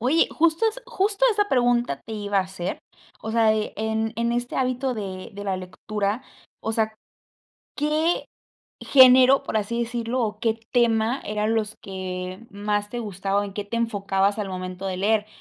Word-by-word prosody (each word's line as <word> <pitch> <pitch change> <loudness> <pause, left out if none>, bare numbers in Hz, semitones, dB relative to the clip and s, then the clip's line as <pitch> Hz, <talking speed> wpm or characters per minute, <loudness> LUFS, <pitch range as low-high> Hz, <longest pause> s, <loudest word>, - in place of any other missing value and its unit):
Oye, 275 +8 +3
justo 335 +6 +2
es 475 +3 -6
justo 415 0 +1
esa 415 0 +1
pregunta 240 - +2
te 225 - -7
iba 205 -1 -2
a 190 - +3
hacer, 185 -1 -5 0.4
o 220 - -4
sea 230 -1 +3
de, 215 -1 0
en 220 +1 -1
en 235 0 0
este 245 0 -2
hábito 255 0 0
de 190 -4 -6
de 205 0 -7
la 195 -2 -1
lectura, 200 +5 -3 0.4
o 225 - -2
sea, 220 -1 0 0.8
¿qué 305 +3 +1 0.5
género, 260 0 +7
por - - -3
así 235 +3 -1
decirlo, 235 +1 -2
o 210 -1 -2
qué 225 0 0
tema 235 +1 +2
eran 215 +1 0
los 215 -1 -1
que 185 0 -5
más 205 0 -2
te 240 - -4
gustaba, 200 -2 -1
o - - -2
en 195 -1 -8
qué 205 - -3
te 230 +3 -3
enfocabas 200 -3 0
al 200 -2 -3
momento 185 0 -6
de 185 -1 -3
leer? 210 +1 +2
220 Hz, 180 wpm, -24 LUFS, 200-245 Hz, 0.8 s, género